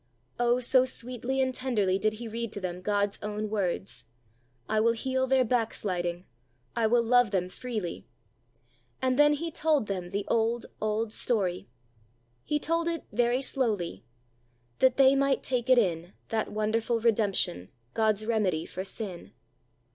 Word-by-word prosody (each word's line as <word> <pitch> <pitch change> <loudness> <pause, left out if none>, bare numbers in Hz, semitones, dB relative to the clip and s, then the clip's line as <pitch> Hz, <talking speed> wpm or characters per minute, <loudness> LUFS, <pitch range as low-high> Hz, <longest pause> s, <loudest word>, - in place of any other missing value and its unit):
Oh, 240 +1 +3
so 255 +1 +4
sweetly 255 +1 -3
and 260 0 -1
tenderly 210 -8 0
did 215 +1 +1
he 230 +2 -7
read 230 0 -4
to - - -4
them 180 -1 -4
God's 205 +1 0
own 210 0 -3
words: 185 - -2 0.6
"I 215 - +1
will 230 +1 +4
heal 260 +2 -1
their 260 -1 +3
back 230 -1 0
sliding, 175 -2 -3 0.5
I 225 -1 +2
will 235 +1 +3
love 245 0 +4
them 185 -2 -1
freely;" 210 -2 -5 0.9
and 260 +1 0
then 295 0 +6
he 330 +3 -3
told 305 -6 +2
them 185 -3 -4
the 200 +1 -3
"Old, 230 +1 +1 0.2
Old 215 +1 -1
Story." 190 -7 0 0.8
He 300 - 0
told 330 +3 0
it 335 -2 -2
very 240 +4 +1
slowly: 205 - -1 0.8
"'That 260 -1 +4
they 270 0 +7
might 275 0 +2
take 250 -1 -1
it 255 - +7
in, 175 -4 +1 0.2
That 220 -1 -1
wonderful 220 +2 0
redemption, 205 - +1 0.2
God's 215 -1 +2
remedy 205 -8 0
for 185 - -5
sin.' 190 - -5
225 Hz, 155 wpm, -28 LUFS, 200-250 Hz, 0.9 s, they